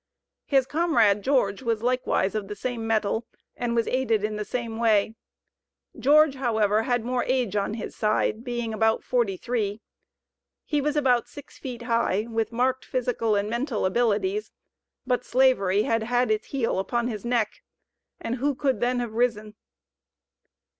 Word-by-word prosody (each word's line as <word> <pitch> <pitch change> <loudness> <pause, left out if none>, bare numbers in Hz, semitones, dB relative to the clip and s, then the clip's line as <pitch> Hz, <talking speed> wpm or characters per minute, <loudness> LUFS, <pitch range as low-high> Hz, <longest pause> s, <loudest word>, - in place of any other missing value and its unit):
His 270 -3 +3
comrade, 275 - +2
George, 250 -6 +1
was 230 -3 -1
likewise 250 -6 +1
of 215 -2 -3
the 210 - -6
same 230 +1 -4
mettle, 220 +1 0 0.3
and 240 -1 -2
was 230 -1 +2
aided 235 -5 +1
in 215 0 -1
the 210 - -3
same 230 0 -4
way. 220 -2 +3 0.8
George, 300 +1 +5
however, 220 -5 +1
had 245 0 -1
more 250 0 0
age 250 -6 0
on 205 +1 -1
his 225 - -6
side, 215 +1 0
being 240 -3 -3
about 220 +1 +1
forty 235 -7 0
three. 215 -2 -2 0.9
He 295 -2 0
was 295 +1 -1
about 255 -5 +2
six 290 - -13
feet 245 -3 -6
high, 230 -3 +1
with 225 -1 -2
marked 255 +2 0
physical 235 -3 -1
and 200 0 0
mental 235 -1 -1
abilities, 240 - 0 0.5
but 250 -1 0
Slavery 215 -8 +3
had 225 0 +1
had 245 +1 +1
its 215 0 -1
heel 235 -8 -1
upon 235 +5 -1
his 215 -4 -5
neck. 235 -3 -1 0.6
And 235 +2 -3
who 280 +2 0
could 265 0 0
then 245 +1 +1
have 235 -2 -5
risen? 220 -3 0
235 Hz, 160 wpm, -25 LUFS, 215-255 Hz, 0.9 s, George